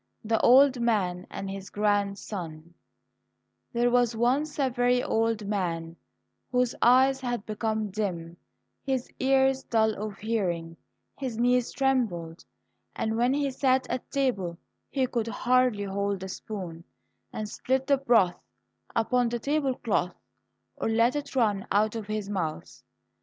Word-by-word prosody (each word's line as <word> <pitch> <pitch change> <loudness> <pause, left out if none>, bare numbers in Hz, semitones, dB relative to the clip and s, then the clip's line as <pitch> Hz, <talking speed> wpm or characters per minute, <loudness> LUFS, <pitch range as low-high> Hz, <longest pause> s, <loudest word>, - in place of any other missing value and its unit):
78 215 - -10
The 225 - +2
Old 265 +1 +6
Man 185 -6 0
and 195 - -6
His 195 0 -6
Grandson 200 -5 -2 1.0
There 240 +1 +2
was 245 -1 +3
once 265 +6 +1
a 270 -3 +1
very 245 0 +2
old 225 -1 0
man, 170 -5 -2 0.6
whose 250 -1 +2
eyes 265 +2 +5
had 245 -4 -3
become 215 -1 -2
dim, 175 -5 -3 0.5
his 265 -2 -2
ears 265 0 +3
dull 220 -3 +2
of 210 -1 -6
hearing, 180 -7 -2 0.4
his 255 -5 -4
knees 245 0 +2
trembled, 215 -12 -1 0.5
and 220 0 -1
when 240 +2 +2
he 285 -1 0
sat 260 0 +1
at 255 - -4
table 200 -11 -1 0.3
he 265 -2 +1
could 235 -3 -2
hardly 250 -2 +2
hold 200 0 -2
the 190 - -5
spoon, 185 -5 -7 0.5
and 215 - -4
spilt 260 +5 -1
the 280 0 +3
broth 230 -9 +3 0.5
upon 245 +1 +2
the 240 - -2
table 275 +1 0
cloth 180 -7 -1 0.6
or - - -1
let 230 +4 +3
it 290 -2 -4
run 210 -6 +1
out 215 +2 +2
of 220 -3 -5
his 215 -1 -3
mouth. 180 -6 -4
225 Hz, 140 wpm, -27 LUFS, 200-255 Hz, 1.0 s, Old